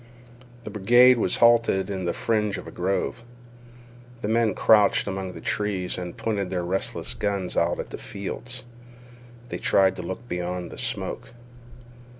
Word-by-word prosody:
The 110 - -7
brigade 120 +5 +6
was 95 - +1
halted 115 -5 +4
in 95 -2 -3
the 85 - +1
fringe 105 -3 0
of - - -8
a - - -9
grove. 95 +6 -1 1.0
The 105 - -2
men 110 -2 +2
crouched 105 -3 +4
among 95 -2 -4
the - - -9
trees 100 -4 -2
and 90 -1 -6
pointed 100 -4 -2
their 90 -2 -2
restless 95 +2 -3
guns 100 -3 -2
out 85 +1 +1
at - - -6
the - - -6
fields. 120 +5 -6 0.9
They - - -4
tried 95 -1 +3
to - - -4
look 95 +7 -6
beyond 90 -1 -4
the - - -8
smoke. 115 - -3
100 Hz, 155 wpm, -25 LUFS, 90-110 Hz, 1.0 s, brigade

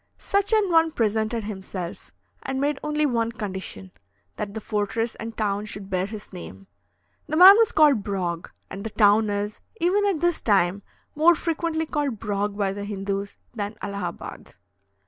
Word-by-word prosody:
Such 400 +1 0
an 425 -4 +3
one 325 -1 +5
presented 220 -3 0
himself, 190 -4 -6 0.3
and 265 0 -3
made 285 0 0
only 300 0 0
one 230 -4 0
condition, 190 -3 -6 0.4
that 210 0 -5
the - - -2
fortress 220 +2 -2
and 225 0 -8
town 205 -1 -1
should 200 -2 -8
bear 185 0 0
his 210 -1 -9
name. 95 - -9 0.6
The 310 - -1
man 375 +3 +11
was 455 - +4
called 295 -7 +5
Brog, 180 -4 -3 0.2
and 195 - -7
the 225 - -3
town 210 0 +4
is, 205 +1 -3 0.2
even 400 +4 +2
at 380 -6 0
this 345 0 +1
time, 195 -2 +2 0.3
more 330 +3 +5
frequently 325 0 -1
called 290 -6 -2
Brog 205 -1 -2
by 195 -2 0
the 200 0 -5
Hindoos 200 0 -4 0.2
than 210 -2 -4
Allahabad." 200 -4 -6
215 Hz, 165 wpm, -24 LUFS, 200-300 Hz, 0.6 s, man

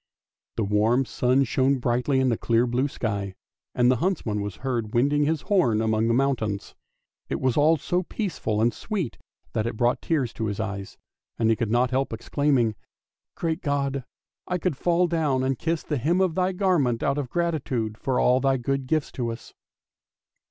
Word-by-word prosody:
The 115 - 0
warm 110 +6 +2
sun 125 +3 +2
shone 135 +2 +2
brightly 125 +2 +1
in 130 -1 +3
the 115 - +2
clear 115 +1 +2
blue 125 +3 0
sky, 100 -7 -3 0.4
and 125 0 +4
the 130 - +2
huntsman 115 - -1
was 100 -2 -4
heard 120 -5 -2
winding 145 +4 +3
his 155 0 0
horn 130 - +2
among 110 0 +1
the 115 - +2
mountains; 115 -7 -1 0.6
it - - -2
was 130 -2 +1
all 155 +3 +4
so 175 +5 -1
peaceful 165 - -2
and 120 +1 +3
sweet 190 - -4 0.3
that 110 +1 0
it 115 - -4
brought 120 +1 +1
tears 140 -8 0
to 110 - -3
his 100 0 -3
eyes, 100 -3 -5 0.4
and 115 -1 +2
he - - +3
could 115 -2 -2
not 120 +2 +2
help 130 -1 0
exclaiming, 120 0 +1 0.3
" - - -68
Great 165 0 -2
God, 140 -2 -1 0.4
I 180 - 0
could 180 -3 -1
fall 175 +5 +2
down 155 -6 0
and 130 -1 -1
kiss 165 0 -1
the 150 - -2
hem 165 +9 +1
of 185 -3 +2
Thy 185 +2 +1
garment 180 - +1
out 140 +1 +1
of 135 -4 -4
gratitude 135 -10 -1
for 130 +2 -1
all 125 +1 +4
Thy 135 0 +2
good 135 +2 -2
gifts 155 0 0
to 120 -2 -3
us! 115 - -10
130 Hz, 190 wpm, -25 LUFS, 115-150 Hz, 0.6 s, and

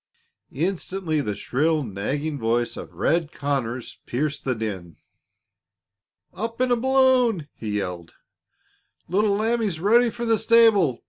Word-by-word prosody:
Instantly 175 0 -2
the 105 -5 -3
shrill, 155 +7 0
nagging 140 +8 -3
voice 120 +1 0
of - - -9
"Red" 165 -1 0
Conners 130 -6 -3
pierced 145 +4 -2
the 130 -2 0
din. 95 -7 -5 1.4
"Up 230 +3 -5
in 255 0 +1
a - - +5
balloon!" 255 - +3
he 105 -2 -4
yelled. 90 -4 -5 0.9
"Little 200 +3 +2
Lambie's 220 -5 0
ready 230 +6 +4
for 235 +2 -5
the 225 -2 +2
stable. 220 - +4
160 Hz, 125 wpm, -24 LUFS, -, 1.4 s, a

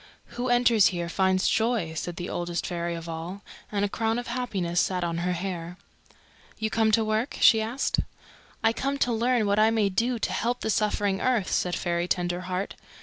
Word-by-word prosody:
"Who 245 +1 -2
enters 240 -4 +5
here 175 -2 -2
finds 190 +1 +2
joy," 220 -8 +1
said 170 +2 -4
the 175 +1 -5
Oldest 175 0 -3
Fairy 170 -1 -2
of 165 0 -7
All, 170 +5 -6 0.3
and 205 -1 +1
a - - +1
crown 225 +2 -1
of 245 - -3
happiness 200 -8 -1
sat 180 -2 -1
on 170 -1 -1
her 180 +1 0
hair. 175 -1 -4 0.8
"You 220 0 -2
come 220 -1 +2
to 225 0 +4
work?" 215 +4 -1
she 220 -2 +6
asked. 235 +5 -1 0.6
"I 225 0 +4
come 275 +3 -2
to 245 -3 +1
learn 235 0 +2
what 200 +1 +2
I 215 +1 +6
may 220 -3 +2
do 235 +6 0
to 220 - -2
help 245 +2 -1
the 220 - 0
suffering 205 -2 0
earth," 240 -7 +1
said 180 -1 +1
Fairy 170 0 -1
Tenderheart. 180 +2 -2
200 Hz, 195 wpm, -26 LUFS, 175-225 Hz, 0.8 s, she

